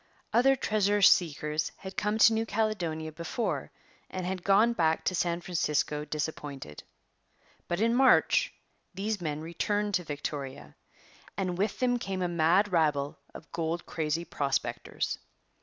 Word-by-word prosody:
Other 270 +3 +5
treasure 205 -4 +1
seekers 155 -4 +3
had 190 0 -9
come 210 +1 0
to 225 +1 +7
New 225 0 0
Caledonia 175 -8 -1
before 170 +9 -3 0.4
and 185 -1 -4
had 185 -1 -3
gone 210 +4 +4
back 160 -6 +1
to - - +1
San 170 -1 0
Francisco 150 -4 -1
disappointed. 145 - -5 0.9
But, 175 +3 -1
in 230 +1 +3
March, 270 - +4 0.4
these 205 +1 -2
men 155 -2 -3
returned 205 +5 -1
to 180 -1 +1
Victoria. 140 - -6 0.6
And 185 -2 -1
with 200 +3 -1
them 245 -1 +1
came 190 -4 -3
a - - +1
mad 175 +4 +3
rabble 150 -5 +1 0.2
of 155 - -11
gold 165 0 -2
crazy 160 +1 -2
prospectors. 140 -4 -2
175 Hz, 140 wpm, -29 LUFS, 155-205 Hz, 0.9 s, to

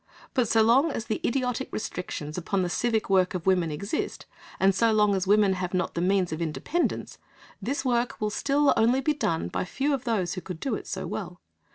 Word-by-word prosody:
But 250 -3 +2
so 220 0 +4
long 260 +8 +4
as 225 - -4
the 220 - -2
idiotic 250 0 -1
restrictions 155 -7 -5
upon 185 +2 -1
the 180 - -1
civic 225 0 0
work 190 -1 +2
of 180 - -4
women 180 -3 +3
exist, 155 +7 -3 0.3
and 195 +1 +4
so 225 +4 +3
long 210 -1 +3
as 190 -1 -1
women 205 -1 +4
have 185 0 -3
not 180 -1 -1
the 170 - -2
means 185 -1 +2
of 160 - -4
independence, 170 - -2 0.4
this 275 +1 -2
work 240 -1 0
will 210 0 -1
still 280 +6 +2
only 245 +4 +3
be 300 +3 +1
done 165 - -1
by - - -2
few 275 +10 -1
of 270 -1 -2
those 200 -7 0
who 185 - -5
could 180 -3 -7
do 270 - -2
it - - -4
so - - -4
well. - - -5
210 Hz, 215 wpm, -27 LUFS, 180-245 Hz, 0.4 s, so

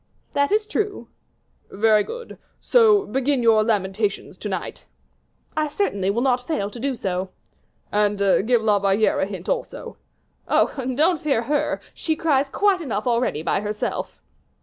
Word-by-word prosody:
"That 285 +3 +1
is 425 +1 +2
true." 420 -1 -3 0.6
"Very 215 +1 +3
good, 475 - -9 0.2
so 435 -4 +4
begin 270 -3 0
your 220 -2 +5
lamentations 205 -1 -1
to - - -5
night." - - -5 0.7
"I 310 0 +1
certainly 200 - -1
will 230 +5 0
not 250 -2 +1
fail 205 -11 -2
to 240 - -9
do 270 +2 -1
so." 185 -3 -3 0.6
"And 205 0 +1
give 220 +4 +2
La 210 -2 +3
Valliere 200 +2 +2
a 190 - +1
hint 190 -3 -8
also." - - -4 0.5
"Oh! - - +2 0.2
don't 320 +3 +2
fear 275 -6 +1
her, 290 +4 0
she 315 - -2
cries 285 -4 +1
quite 395 +3 +2
enough 225 -8 -3
already 235 -10 0
to - - +1
herself." 210 0 -4
235 Hz, 150 wpm, -23 LUFS, 205-305 Hz, 0.7 s, your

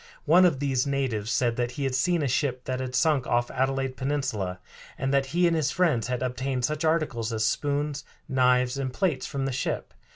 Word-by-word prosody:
One 175 +5 +6
of 155 -7 +2
these 135 -2 0
natives 130 -7 -1
said 120 -2 +1
that 120 0 -1
he 140 - -4
had 135 -1 0
seen 165 +5 +1
a - - +1
ship 130 -1 -1
that 130 0 -3
had 130 -1 -4
sunk 150 -4 +2
off 120 0 +1
Adelaide 135 0 -1
Peninsula, 130 -10 -2 0.4
and 135 +1 -1
that 135 -1 +2
he 175 +6 +2
and 170 -1 +3
his 155 -4 +1
friends 150 -12 +1
had 125 0 -2
obtained 130 0 -1
such 150 +3 -2
articles 155 -8 0
as 110 -1 0
spoons, 145 +4 -1 0.2
knives, 125 0 +2
and 130 -1 -2
plates 150 -3 -1
from 140 -2 -3
the 135 - -1
ship. 130 - -3
135 Hz, 205 wpm, -26 LUFS, 125-145 Hz, 0.4 s, One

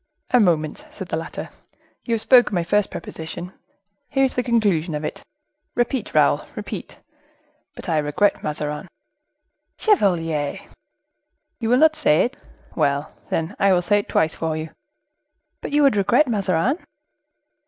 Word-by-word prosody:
"A 250 - +5
moment," 160 -7 +1
said 190 -3 -9
the - - -1
latter; 160 +1 -6 0.5
"you 230 - +1
have 220 - -2
spoken 245 -5 +5
my 175 - +1
first 205 +4 +1
proposition, 175 +3 -7 0.6
here 270 -1 +2
is 260 - -1
the 250 - 0
conclusion 200 -10 +1
of 150 - -4
it,—repeat, 300 - -5
Raoul, - - +4
repeat: - - -7 0.8
'But - - -9
I 160 -3 +2
regret 150 +8 +1
Mazarin.'" 150 +3 -3 0.9
"Chevalier!" 165 - +1 1.0
"You 225 -2 -2
will 245 - +5
not 315 +2 +5
say 150 - +3
it? 250 +4 -5 0.4
Well, 140 +1 0 0.2
then, 165 +5 -2
I 195 -1 +4
will 180 -1 +2
say 205 +3 +3
it 205 - -7
twice 160 0 +2
for 160 -1 -2
you." 155 0 -5 0.9
"But - - -5
you 295 0 +3
would 275 -6 +5
regret 240 +9 +3
Mazarin?" 210 - +1
195 Hz, 145 wpm, -22 LUFS, 160-245 Hz, 1.0 s, A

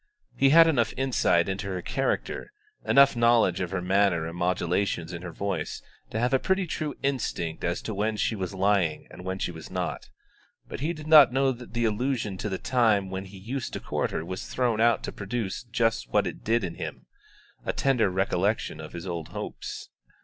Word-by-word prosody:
He 135 - +4
had 165 +3 +8
enough 125 -9 +1
insight 125 -10 +2
into 100 +1 -3
her 90 -2 -4
character, 135 - -2 0.3
enough 140 -1 +5
knowledge 115 -6 +4
of 90 - -2
her 95 -1 -3
manner 95 -2 +3
and - - -3
the - - -8
modulations 90 -1 0
in 85 - -6
her 90 -1 -6
voice, 95 -4 -3 0.3
to - - -4
have 125 +3 +1
a 135 - +4
pretty 190 +4 +1
true 155 -3 -3
instinct 115 -12 -2
as 85 +1 -1
to 110 - -4
when 105 +2 -1
she 110 - 0
was 95 -1 -4
lying 95 -4 +1
and 90 - -10
when 95 +1 -3
she 90 - -2
was 80 -2 -10
not; - - -4 0.6
but - - -7
he 150 +5 -1
did 155 -3 -8
not 155 -5 +8
know 135 +1 +2
that 125 -2 -10
the 120 0 +1
allusion 110 -1 -1
to 105 - -2
the 95 - -2
time 110 -7 +2
when 95 +1 -4
he 95 +1 -12
used 120 +7 -5
to - - -3
court - - -2
her 80 - -3
was 95 +1 -5
thrown 120 -3 0
out 115 -1 +3
to - - -4
produce 100 -1 -4
just 115 - 0
what - - +3
it - - -6
did 115 0 +1
in 85 -3 -3
him, - - -6 0.6
a - - -1
tender 125 -7 +2
recollection 95 -1 0
of 75 - -9
his 85 0 -6
old 85 -4 -4
hopes. - - -7
105 Hz, 210 wpm, -27 LUFS, 90-125 Hz, 0.6 s, had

